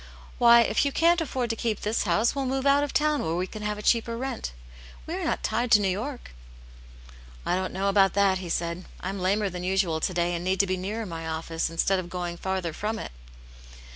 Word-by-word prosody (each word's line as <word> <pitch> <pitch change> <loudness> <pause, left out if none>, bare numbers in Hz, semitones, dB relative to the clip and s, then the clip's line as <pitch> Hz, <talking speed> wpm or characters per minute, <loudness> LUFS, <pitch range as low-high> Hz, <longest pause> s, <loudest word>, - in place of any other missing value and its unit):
Why, 235 -1 +8
if - - +2
you 280 - +1
can't 335 +3 +3
afford 255 -6 -2
to - - -2
keep 220 -2 -2
this 215 +1 0
house, 205 +6 +2
we'll 275 -2 -2
move 265 +1 -1
out 280 +1 +4
of 290 - -2
town 300 -1 +2
where 160 +1 -1
we 180 +1 0
can 215 +3 -9
have 210 0 -2
a 210 - -8
cheaper 230 0 +2
rent. 255 - -4 0.5
We - - -5
are - - -3
not - - -1
tied 235 +3 0
to 210 - +8
New 200 -2 +1
York." 240 +8 -4 0.6
" - - -19
I - - +1
don't 185 0 -2
know 195 +2 -1
about 195 -2 +4
that," 195 -2 +3
he 180 -2 -7
said. 170 +2 -2
" - - -19
I'm 190 +2 -4
lamer 200 +3 +1
than 180 -1 -5
usual 185 -3 +1
to 170 - -1
day 175 0 +1
and 170 0 -3
need 185 +1 0
to - - 0
be 185 -1 -1
nearer 210 +5 -4
my 165 -3 -6
office, 160 0 -2
instead 185 +3 +1
of 175 -1 -6
going 175 -1 -4
farther 185 -3 -2
from 215 +5 -3
it." - - -6
195 Hz, 240 wpm, -26 LUFS, 175-230 Hz, 0.6 s, Why